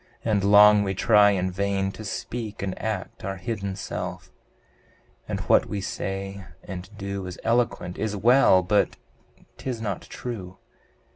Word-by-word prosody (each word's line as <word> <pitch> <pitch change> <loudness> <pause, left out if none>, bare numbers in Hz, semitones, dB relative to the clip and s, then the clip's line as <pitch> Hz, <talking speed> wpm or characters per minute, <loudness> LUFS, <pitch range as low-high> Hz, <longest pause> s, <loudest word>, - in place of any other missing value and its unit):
And 105 -3 +1
long 105 +1 +7
we 95 -1 -1
try 105 +1 +5
in 95 -2 0
vain 95 0 -1
to 110 - -9
speak 110 +1 -5
and 95 -2 -2
act 110 -4 -4
Our 95 +1 -3
hidden 100 0 -4
self, - - -6 1.0
and - - -3
what - - +3
we 105 - -3
say 95 0 -4 0.2
and 95 -1 -7
do 100 -1 -4
Is 90 - -8
eloquent, 115 -6 0
is 105 -1 -1
well 105 -3 +5
but 100 +4 +2 0.6
'tis 125 -3 -4
not 105 -5 -3
true! 95 -7 -7
100 Hz, 145 wpm, -25 LUFS, 95-110 Hz, 1.0 s, long